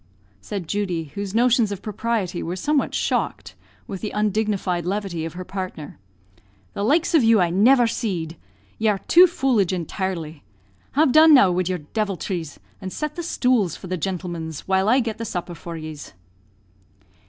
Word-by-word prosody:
said 190 - -5
Judy, 175 -6 -2
whose 200 0 -5
notions 235 -2 +3
of 200 - -6
propriety 210 -4 -2
were 170 +2 -3
somewhat 285 +9 0
shocked - - -1 0.3
with 195 -6 -7
the 215 - -3
undignified 210 -4 -1
levity 185 -3 -3
of 165 - -6
her 180 +1 -7
partner; 185 - -6 0.7
"the - - -4
likes 310 +10 +2
of 315 -6 +5
you 225 -1 +5
I 175 -2 +2
never 240 +7 +5
seed; 185 -9 -3 0.4
ye 220 - +1
are 205 - +1
too 355 - +6
foolidge 255 - +1
intirely. 170 -3 -4 0.5
Have 290 -1 +3
done 310 +2 +8
now 200 -9 +6
wid 180 0 0
your 180 -3 -2
diviltries, 190 -7 -3 0.2
and 190 -1 -5
set 300 +6 -4
the 345 - -4
stools 250 - +1
for - - -11
the 185 0 -2
gintlemens, 170 -3 -4
while 190 +1 +1
I 255 +3 +4
get 225 -2 -4
the - - -3
supper 175 -5 -4
for 170 0 -8
yes." 155 -5 -8
195 Hz, 165 wpm, -22 LUFS, 175-230 Hz, 0.7 s, done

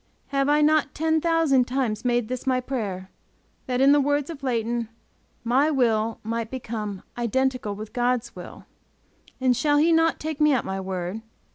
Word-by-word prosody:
Have 275 0 +1
I 295 +1 +4
not 300 -1 +2
ten 320 0 +1
thousand 325 -6 +3
times 245 -4 -2
made 240 -2 +1
this 255 +2 -5
my 255 -1 +2
prayer, 205 -8 -4 0.6
that 250 0 0
in 275 +1 +6
the 290 0 +5
words 290 +2 0
of 295 -4 -9
Leighton, 235 -3 -1 0.5
my 260 +6 +3
will 230 -6 +1
might 225 0 -3
become, 220 -6 -5 0.2
"identical 250 -2 0
with 215 +1 -9
God's 245 -1 -1
will." - - -10 0.7
"And 255 -1 +3
shall 290 +4 +2
He 320 +3 +4
not 325 0 +3
take 310 -1 -4
me 300 -1 +5
at 255 - 0
my 190 0 -3
word?" 185 +2 -4
255 Hz, 170 wpm, -24 LUFS, 225-290 Hz, 0.7 s, in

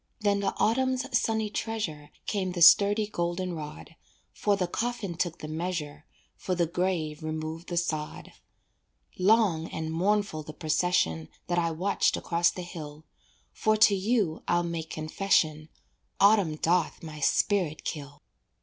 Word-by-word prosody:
Then 205 -1 +2
the 200 - -1
autumn's 260 +3 +1
sunny 220 -2 +1
treasure 195 -11 -4 0.2
Came 190 -3 -2
the 175 -2 +2
sturdy 205 +5 +7
golden 175 -2 -2
rod, 155 0 -8 0.4
For 205 -1 +1
the 190 -2 0
coffin 220 0 -3
took 170 0 -2
the 155 - -7
measure, 155 -2 -4 0.3
For 185 - -3
the 170 -1 +2
grave 165 -3 -2
removed 155 +2 -5
the 175 - -3
sod. 155 -3 -3 0.9
Long 185 -5 +3
and 160 0 -4
mournful 200 -1 0
the 155 0 -9
procession 150 - 0 0.2
That 175 0 0
I 170 -1 +1
watched 180 +5 +1
across 170 0 +2
the 180 - -6
hill, 155 -3 -9 0.5
For 215 - +1
to 215 -1 +6
you 200 -4 0
I'll 175 0 +2
make 165 -2 -4
confession, 155 -1 0 0.5
Autumn 200 -6 +4
doth 170 +1 0
my 155 -2 -8
spirit 170 +1 +1
kill. 145 -2 -6
175 Hz, 140 wpm, -28 LUFS, 155-200 Hz, 0.9 s, sturdy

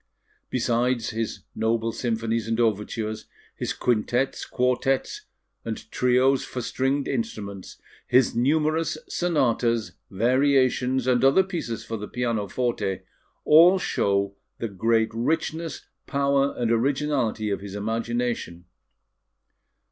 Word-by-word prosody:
Besides 120 -1 0
his 115 0 -3
noble 115 0 0
symphonies 115 -1 -2
and 115 +1 -1
overtures, 110 0 -1 0.3
his - - -3
quintettes, 120 +2 0
quartettes, 125 +1 0 0.4
and 115 -1 -3
trios, 130 +2 +3
for 125 - -6
stringed 135 +4 -1
instruments, 100 - -4 0.3
his 125 -1 +3
numerous 155 +5 +1
sonatas, 120 -9 +1 0.2
variations, 130 +3 +2
and 125 -1 +2
other 135 +8 +5
pieces 140 - -5
for 115 0 -4
the 105 0 -6
pianoforte, 115 -3 -2 0.4
all 170 +5 +7
show 100 - 0 0.2
the 115 - -3
great 110 +3 +1
richness, 160 +6 -2 0.2
power, 140 -1 +1
and 120 -2 0
originality 125 -3 0
of 100 - -2
his 100 0 -7
imagination. 115 -4 -2
120 Hz, 105 wpm, -25 LUFS, 110-135 Hz, 0.4 s, all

